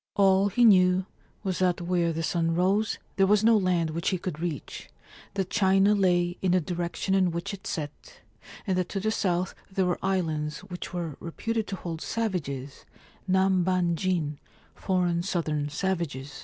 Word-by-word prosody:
All 195 0 +4
he 240 +5 +3
knew 185 -3 +5 0.4
was 190 -3 -2
that 180 -2 +2
where 175 -1 +1
the 165 0 -3
sun 165 0 0
rose 195 +5 +1 0.2
there 195 0 +4
was 210 +1 +4
no 225 0 +6
land 180 -5 +1
which 170 +2 -1
he 190 - 0
could 175 -3 -5
reach, 165 -5 -5 0.5
that 190 -2 -2
China 195 +1 +4
lay 175 -3 +2
in 185 -2 +2
the 185 - +4
direction 175 +2 -2
in 190 -2 +3
which 170 +4 -4
it 195 - -8
set, 150 -3 -6 0.5
and 190 - 0
that 180 - -2
to 195 - -2
the 220 +3 0
south 180 -4 0 0.2
there 190 -1 +1
were 180 -1 0
islands 160 -6 -1
which 180 -1 -7
were 170 -5 -4
reputed 225 +6 -3
to 195 - -3
hold 170 -3 -6
savages, 145 - -3 0.4
Nambanjin 185 -4 +1 0.3
(foreign 180 -3 0
southern 155 -5 -1
savages). 150 -5 -2
180 Hz, 165 wpm, -27 LUFS, 170-190 Hz, 0.5 s, no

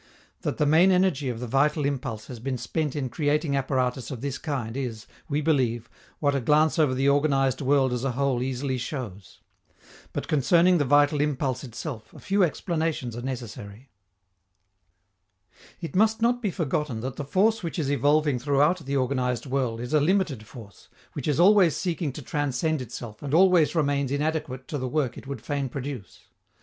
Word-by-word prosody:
That - - -2
the 150 - +2
main 160 +6 +5
energy 180 -7 +2
of 120 -2 -4
the 125 - -4
vital 145 +4 +1
impulse 130 -6 -3
has 125 -3 -9
been 130 +2 -3
spent 150 +4 -2
in 140 -3 -2
creating 145 +3 0
apparatus 130 -2 -1
of 130 -4 -6
this 140 -1 -3
kind 130 -7 -4
is, 120 -6 -4 0.2
we 150 +1 0
believe, 125 -7 0 0.3
what 145 -2 +1
a 140 - 0
glance 150 +5 +3
over 145 -5 +3
the 135 +2 +1
organized 140 -2 +2
world 135 -2 +2
as 125 0 -2
a 135 -2 -1
whole 135 -1 0
easily 130 0 -2
shows. 105 - -7 0.7
But - - -4
concerning 170 +5 +4
the 145 - +2
vital 145 +2 +4
impulse 135 -3 -1
itself 120 -2 -7
a - - -11
few 200 0 0
explanations 160 -7 -1
are 120 - -5
necessary. 120 -2 -7 1.9
It 170 0 -7
must 220 +3 +3
not 240 +1 +2
be 210 - 0
forgotten 150 - -2
that 130 +1 -5
the 145 - -3
force 205 +10 +2
which 170 -1 -4
is 145 -4 -1
evolving 145 0 +2
throughout 145 +7 +2
the 140 -3 -2
organized 125 -2 -1
world 130 -4 -1
is 125 +5 -5
a 155 - +5
limited 150 - 0
force, 105 -4 -13 0.2
which 145 - -5
is 150 0 +1
always 185 -3 +6
seeking 170 -4 -2
to 145 - -8
transcend 145 +2 -1
itself 120 -3 -8
and 145 +1 -1
always 180 -3 +5
remains 140 -3 +1
inadequate 145 -3 -2
to 145 - -3
the 130 - -2
work 135 -4 -1
it - - -11
would 135 -5 -6
fain 140 -2 -2
produce. 135 -5 -7
140 Hz, 180 wpm, -26 LUFS, 125-155 Hz, 1.9 s, always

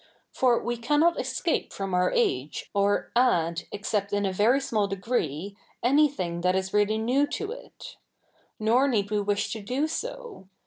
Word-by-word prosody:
For 250 -2 +3
we 240 0 -3
ca?inot 295 +8 +2
escape 335 - -1
from 195 -1 -4
our 180 0 +2
age, 130 +3 -1
or 200 0 +1
add, 175 -9 +2
except 205 0 -2
in 205 0 +1
a 190 - -1
very 225 +8 +3
small 220 -7 -1
deg7'ee, 195 - -2 0.3
a7iything 260 - +2
that 180 +1 +2
is 190 0 -2
really 210 +1 +2
7iew 255 +6 +1
to 415 +1 -4
it. - - -11 0.6
Nor 235 +5 +3
7ieed 205 -5 0
we 210 -1 +1
wish 205 0 -1
to 220 - -6
do 255 +8 -1
so. 405 - -6
210 Hz, 165 wpm, -26 LUFS, 195-260 Hz, 0.6 s, For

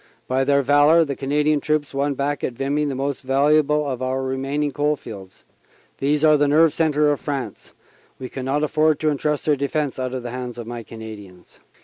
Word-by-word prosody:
By 130 +1 +1
their 140 +1 +2
valor 145 +4 +5
the 140 -2 -4
Canadian 150 +2 +1
troops 150 -1 -1
won 140 +1 0
back 145 +2 -2
at 125 - -2
Vimy 140 +4 -1
the 140 -2 -2
most 140 +1 -3
valuable 150 +2 +2
of 130 -2 -4
our 130 +1 -1
remaining 135 +3 -2
coal 150 +1 0
fields. 100 -8 -11 0.5
These 145 +2 +1
are 155 -1 +6
the 145 0 +2
nerve 155 +2 +4
centre 150 -2 +2
of 145 - -1
France. 135 -8 -5 0.4
We 130 - -6
can 130 0 -6
not 145 +3 0
afford 155 0 +2
to 155 -1 +2
entrust 150 0 -1
their 150 - +3
defense 140 0 -2
out 130 0 -3
of 125 - -5
the 120 - -5
hands 125 -1 -6
of 120 - -6
my 120 0 -6
Cana 110 0 -10
dians." 95 -4 -16
140 Hz, 210 wpm, -22 LUFS, 130-150 Hz, 0.5 s, are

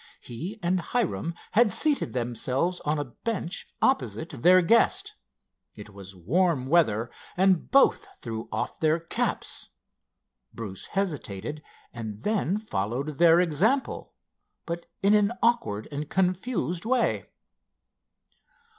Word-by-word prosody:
He 165 - -7
and 180 +2 +2
Hiram 170 -5 -2 0.2
had 225 -1 +4
seated 300 +7 +2
themselves 130 +8 -1
on 150 +1 -1
a 145 - -2
bench 180 - -4 0.2
opposite 260 -10 +1
their 180 +7 +5
guest. 230 +7 +3 0.6
It 105 0 -11
was 100 -1 -11
warm 145 - +1
weather 120 -7 +2 0.3
and 185 -2 +3
both 275 0 +4
threw 115 -2 -6
off - - -3
their 160 +1 +2
caps. 165 - -3 0.9
Bruce 100 -5 -6
hesitated 150 - -3 0.3
and 110 -3 -7
then 205 -3 0
followed 135 - -3
their 170 0 +7
example, 185 - 0 0.5
but 170 0 -5 0.2
in 200 +1 +5
an 210 +1 +3
awkward 230 - +1
and 145 +1 -4
confused 185 - -1
way. 245 +2 +1
165 Hz, 115 wpm, -27 LUFS, 120-195 Hz, 0.9 s, their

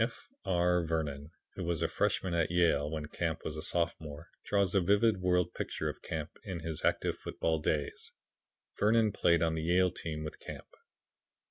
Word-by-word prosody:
F. - - -5 0.2
R. 90 -1 +3
Vernon, 75 -3 -2 0.2
who 95 - -5
was 85 -2 -1
a - - +3
freshman 95 -2 0
at 85 -2 +2
Yale 85 -4 +3
when 80 -1 -3
Camp 80 +2 -3
was 80 - -3
a 75 - -4
sophomore, 85 -2 -2
draws 100 -3 +1
a 100 - +4
vivid 100 +4 +4
word 90 -1 +2
picture - - -2
of - - -7
Camp 80 0 -5
in 95 -6 -5
his 80 -1 -5
active - - +1
football 80 -1 -1
days. 75 -2 -2 0.7
Vernon 110 0 +4
played 85 -3 +3
on 80 -1 +2
the 80 - -2
Yale 90 +2 +3
team 75 -2 -4
with 75 - -6
Camp. - - -8
85 Hz, 175 wpm, -32 LUFS, 80-90 Hz, 0.7 s, a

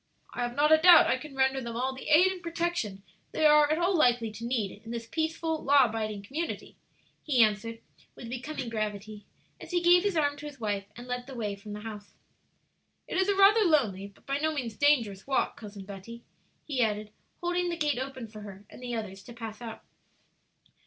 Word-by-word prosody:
"I - - -4
have 240 0 -2
not 295 +2 +3
a 315 - +7
doubt 345 +1 +8
I 255 - +1
can 280 0 -10
render 265 0 +2
them 235 -2 -6
all 260 +3 -1
the 265 - -8
aid 355 +5 +6
and 370 -2 -7
protection 335 - -3 0.3
they 315 - +1
are 300 0 +6
at 310 - +2
all 355 +2 +1
likely 245 -7 +3
to 215 +2 -10
need 225 -5 -2
in 225 - -11
this 230 0 -5
peaceful, 320 +3 -2
law 280 -1 +6
abiding 215 -3 -3
community," 310 +10 -5 0.5
he 255 -6 +4
answered, 225 +2 -1 0.3
with 240 - -9
becoming 255 +2 -5
gravity, 210 -2 -4 0.3
as - - -11
he 355 - +1
gave 350 +1 +6
his 400 -4 0
arm 290 -2 +1
to 295 +1 -7
his 285 -3 -11
wife, 205 -3 -2
and 240 - -9
led 250 0 -4
the 270 - -9
way 210 -4 -3
from 205 +1 -10
the 210 - -7
house. 210 -2 -9 0.9
"It - - -5
is 380 +1 +2
a 400 - +3
rather 400 +3 +6
lonely 240 - +2
but 200 - -21
by 275 +1 -1
no 315 +1 +1
means 250 -8 -4
dangerous 230 -8 +2
walk, 270 - 0
Cousin 205 -3 -10
Betty," 205 +4 -10 0.4
he 275 -5 -1
added, 210 -2 -1 0.3
holding 350 0 0
the 340 - -3
gate 295 -5 0
open 260 -3 -5
for 215 0 -11
her 200 -1 -10
and - - -12
the 245 -1 -4
others 195 -4 -5
to 240 - -10
pass 225 -1 -8
out. 230 -2 -8
245 Hz, 215 wpm, -29 LUFS, 215-305 Hz, 0.9 s, doubt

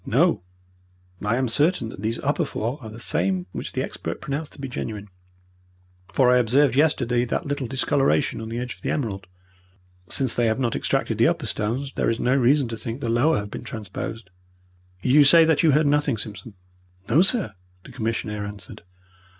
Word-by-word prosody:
"No, - - +2 0.8
I 105 +3 0
am 130 +1 0
certain 145 0 +1
that 95 - -10
these 110 +2 -1
upper 145 +4 0
four 125 -1 -3
are 110 - -8
the 110 - -10
same 95 -5 -1
which - - -6
the - - -1
expert - - -5
pronounced 145 +2 -4
to - - -14
be 135 - -4
genuine, 105 -5 -6 1.0
for 125 -2 +4
I 125 - +5
observed 125 +3 +3
yesterday 125 -5 +2
that 125 - -2
little 145 -3 -3
discoloration 135 - +1
on 110 - -6
the 115 - -4
edge 125 0 -4
of - - -20
the - - -3
emerald. 100 -9 -3 0.8
Since 130 -4 +1
they 120 -1 +1
have 110 - +1
not 120 -4 -1
extracted - - -1
the - - +5
upper - - -1
stones, 125 +6 -2
there - - 0
is 115 - -1
no 125 +2 +2
reason 135 +1 +3
to 115 - -5
think 115 +3 -6
the 120 - -3
lower 120 +8 +3
have 100 0 -5
been - - -7
transposed. 110 -2 -7 0.7
You 145 +4 +6
say 165 +3 +7
that 160 -2 +3
you 165 - +4
heard 150 +2 +4
nothing, 145 -3 +2
Simpson?" 105 +1 -8 0.5
"No, 150 +9 +4
sir," 195 - +4 0.3
the - - -13
commissionaire 110 -2 -3
answered. 100 -3 -8
120 Hz, 190 wpm, -24 LUFS, 110-140 Hz, 1.0 s, say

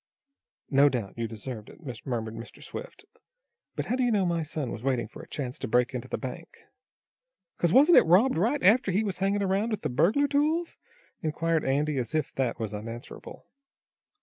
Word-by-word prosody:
"No 140 +1 +6
doubt 120 -7 -4
you 115 -1 -2
deserved 110 0 -7
it," - - -14 0.3
murmured 115 -3 -2
Mr. 115 +1 -10
Swift. - - -9 0.7
"But - - -2
how 250 - 0
do 260 - -1
you 245 - +3
know 205 -4 +2
my 170 -1 0
son 150 -4 -4
was - - -6
waiting 125 -3 0
for - - -11
a - - -13
chance 130 -4 -5
to - - -3
break 125 +3 +2
into 125 0 -4
the - - -3
bank?" 145 +6 -7 1.1
"'Cause, 170 - +2
wasn't 290 - +8
it - - +1
robbed 195 +11 +5
right 235 - +1
after 215 +2 +5
he 200 +4 +1
was 195 -4 -3
hangin' 200 +1 +1
around 195 +2 +1
here - - -2
with 215 - -3
the - - 0
burglar 185 - +3
tools?" 310 +4 +1 0.5
inquired 160 0 0
Andy, 145 +1 +1
as 120 +3 -3
if 155 - -1
that 125 -2 -1
was 110 -2 -3
unanswerable. 115 +3 -8
155 Hz, 200 wpm, -28 LUFS, 125-205 Hz, 1.1 s, wasn't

